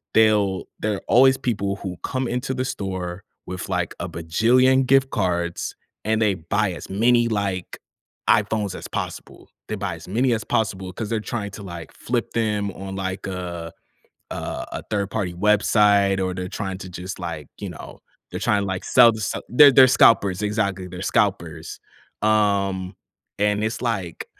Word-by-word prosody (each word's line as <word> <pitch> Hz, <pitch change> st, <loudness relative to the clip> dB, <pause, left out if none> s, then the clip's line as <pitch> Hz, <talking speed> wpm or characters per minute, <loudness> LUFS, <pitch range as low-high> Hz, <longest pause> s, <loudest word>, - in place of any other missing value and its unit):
they'll 105 Hz, -4 st, +3 dB, 0.2 s
they're 105 Hz, -2 st, -2 dB
always 130 Hz, +2 st, +6 dB
people 100 Hz, -5 st, -1 dB
who 90 Hz, -3 st, -6 dB
come 130 Hz, -1 st, -2 dB
into 125 Hz, +2 st, -2 dB
the 130 Hz, 0 st, -1 dB
store 95 Hz, -4 st, -4 dB, 0.2 s
with, 90 Hz, 0 st, -6 dB
like, -, -, -1 dB
a -, -, -4 dB
bajillion 125 Hz, +11 st, +3 dB
gift 135 Hz, 0 st, +4 dB
cards 85 Hz, -1 st, -1 dB, 0.3 s
and 110 Hz, 0 st, +1 dB
they 105 Hz, -2 st, +3 dB
buy 95 Hz, +4 st, -1 dB
as -, -, -9 dB
many, 120 Hz, +4 st, +3 dB
like, 100 Hz, -4 st, -2 dB, 0.5 s
iPhones 105 Hz, -2 st, +2 dB
as -, -, -7 dB
possible. -, -, -6 dB, 0.2 s
They 110 Hz, -, -3 dB
buy 100 Hz, -4 st, -3 dB
as 80 Hz, -, -12 dB
many 120 Hz, +6 st, +1 dB
as 110 Hz, -, -2 dB
possible 95 Hz, -4 st, -1 dB
'cause 110 Hz, +1 st, -5 dB
they're 115 Hz, -1 st, 0 dB
trying 105 Hz, -3 st, -4 dB
to, 100 Hz, -, -9 dB
like, 85 Hz, -4 st, -8 dB
flip 120 Hz, -1 st, -2 dB
them 105 Hz, -3 st, 0 dB
on, 95 Hz, 0 st, -7 dB
like, 95 Hz, 0 st, -4 dB
a 85 Hz, -3 st, -5 dB, 0.6 s
a -, -, -4 dB, 0.4 s
a -, -, -4 dB
3rd 100 Hz, -2 st, -1 dB
party 95 Hz, -5 st, -2 dB
website, 100 Hz, 0 st, +3 dB
or 95 Hz, 0 st, -1 dB
they're 90 Hz, 0 st, -4 dB
trying 95 Hz, -2 st, -4 dB
to 95 Hz, -1 st, -8 dB
just, 90 Hz, +2 st, -7 dB
like, 80 Hz, -5 st, -6 dB
you -, -, -5 dB
know, -, -, -10 dB, 0.3 s
they're -, -, -5 dB
trying, 100 Hz, -1 st, +1 dB
like, 95 Hz, -1 st, -3 dB
to -, -, -7 dB
sell 120 Hz, -2 st, +7 dB
to 110 Hz, -, -6 dB
so 95 Hz, -, -3 dB
they're 140 Hz, +2 st, +8 dB
they're 130 Hz, 0 st, +8 dB
scalpers, 100 Hz, -6 st, +4 dB
exactly, 100 Hz, -3 st, -1 dB
they're 90 Hz, +1 st, -7 dB
scalpers. 85 Hz, -7 st, -1 dB, 0.4 s
Um, 100 Hz, -3 st, +1 dB, 0.4 s
and 105 Hz, 0 st, +1 dB
it's, 110 Hz, +2 st, -3 dB
like, 100 Hz, -8 st, -3 dB
100 Hz, 170 wpm, -23 LUFS, 95-110 Hz, 0.6 s, they're